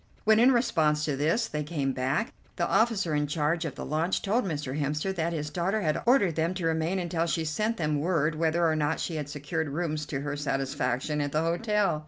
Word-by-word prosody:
When, 220 0 +5
in 250 +3 +6
response 155 -12 +2
to 150 - -1
this, 165 - +1
they 150 - -3
came 145 -3 -1
back, 135 - -1 0.2
the - - 0
officer 215 -8 +2
in 150 0 +1
charge 160 +3 0
of 150 - -4
the - - -6
launch 160 +5 0
told 215 +3 +1
Mr. 150 -4 -3
Hemster 150 +7 -1
that 170 -2 -1
his 150 -2 -3
daughter 190 +5 0
had 155 -4 0
ordered 220 -9 +4
them 165 +3 0
to 180 -3 -3
remain 165 +3 0
until 170 -2 -1
she 165 -1 -1
sent 215 +9 -1
them 150 -4 0
word 160 -1 +1
whether 165 +2 +1
or 160 - +2
not 155 +1 0
she 165 - -3
had 145 -1 -4
secured 150 +2 -3
rooms 155 0 -2
to 135 -3 -3
her 145 0 -3
satisfaction 135 0 -1
at 145 -1 -2
the 155 +1 +2
hotel. 195 0 +1
160 Hz, 220 wpm, -28 LUFS, 150-175 Hz, 0.2 s, in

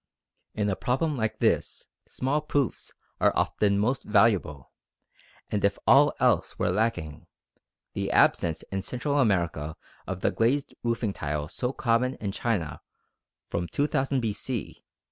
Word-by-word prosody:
_ - - -5
In 105 - +2
a 100 - 0
problem 145 - 0
like 110 -3 -2
this - - 0 0.2
small 140 +4 -1
proofs 145 -3 -1 0.3
are - - +4
often 100 -1 +1
most 115 +6 +1
valuable, 100 - +2 0.8
and 105 - -1
if 100 0 +2
all 145 +2 +6
else 125 -8 +2
were - - +1
lacking, 90 -7 -2 0.7
the - - -2
absence 80 -2 +3
in 95 0 -1
Central 140 +7 -1
America 85 - 0 0.3
of 95 0 -4
the - - +2
glazed 130 +5 +1
roofing 115 -3 -1
tile 75 -2 -3
so 125 +10 -3
common 125 -2 +1
in 100 -2 -4
China 95 -8 -2 0.7
from 85 0 -2
2000 140 - 0
B.C. 115 +1 -4
110 Hz, 140 wpm, -27 LUFS, 95-130 Hz, 0.8 s, all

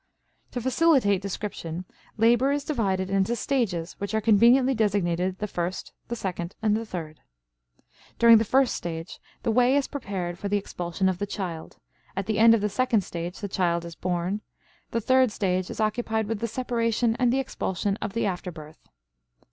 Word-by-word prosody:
To 245 - -4
facilitate 260 - +3
description, 185 -3 -5 0.3
labor 235 +4 +4
is 285 0 0
divided 195 -10 -1
into 195 +4 +1
stages 205 -10 -1
which 200 +2 -3
are - - +3
conveniently 235 +5 +5
designated 190 -5 0
the 210 - -3
first, 180 -2 -4
the 235 - -3
second, 180 -4 -4
and 215 -1 +2
the 225 +1 -3
third. 160 -6 -6 1.0
During 230 -1 +8
the - - +2
first 260 +3 +3
stage 165 0 -6 0.2
the - - +1
way 250 +3 +4
is 285 -1 +2
prepared 185 -10 -4
for 200 - -3
the 205 - +2
expulsion 180 -1 -2
of 185 -2 0
the 205 - -2
child; 175 -5 -5 0.4
at 195 0 -2
the 215 +1 -1
end 230 0 +8
of 220 - -1
the 210 - +1
second 230 0 +1
stage 175 0 -6
the 205 - -2
child 170 -3 0
is 170 - -7
born; 180 +4 -2 0.5
the 230 - -1
third 260 +1 +4
stage 185 -3 -1
is - - -7
occupied 220 0 0
with 220 0 -3
the 230 - -1
separation 230 -1 0
and 245 -2 +3
the 265 - +2
expulsion 200 -6 -2
of 195 - -3
the 230 - 0
after 180 -2 -3
birth. 155 -2 -13
205 Hz, 180 wpm, -26 LUFS, 180-235 Hz, 1.0 s, During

